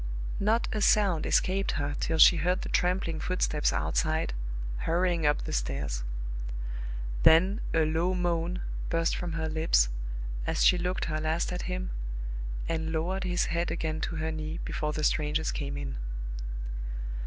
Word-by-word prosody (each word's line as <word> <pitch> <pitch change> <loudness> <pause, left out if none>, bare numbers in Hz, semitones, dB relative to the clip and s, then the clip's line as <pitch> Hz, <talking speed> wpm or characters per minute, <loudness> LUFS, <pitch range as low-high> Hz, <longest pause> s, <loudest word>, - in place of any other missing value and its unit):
Not 220 +4 +2
a 215 - -1
sound 195 -7 +4
escaped 195 +1 +2
her 145 -1 -1
till 160 - 0
she 170 - +8
heard 180 +4 +1
the - - -4
trampling 180 -3 +1
footsteps 155 -5 +1
outside, 160 - 0 0.4
hurrying 170 - +1
up 150 - +2
the - - -4
stairs. - - -2 1.2
Then 185 - +6
a 160 -1 +3
low 165 +4 +1
moan 175 0 0 0.3
burst 165 0 +1
from 175 -2 -3
her 160 -1 -1
lips, 155 - +3 0.6
as - - +2
she 180 - +6
looked 180 +1 -1
her 155 -1 -1
last 160 +3 0
at 180 - -3
him, 185 0 -3 0.8
and 160 -1 -1
lowered 180 +4 -1
his 180 0 +1
head 170 +1 0
again 160 -1 -2
to 165 - -2
her 160 0 -1
knee, 155 +1 -4
before 150 0 -2
the 155 0 -3
strangers 150 +1 +1
came 140 -2 -3
in. 65 -2 -4
165 Hz, 155 wpm, -29 LUFS, 155-180 Hz, 1.2 s, she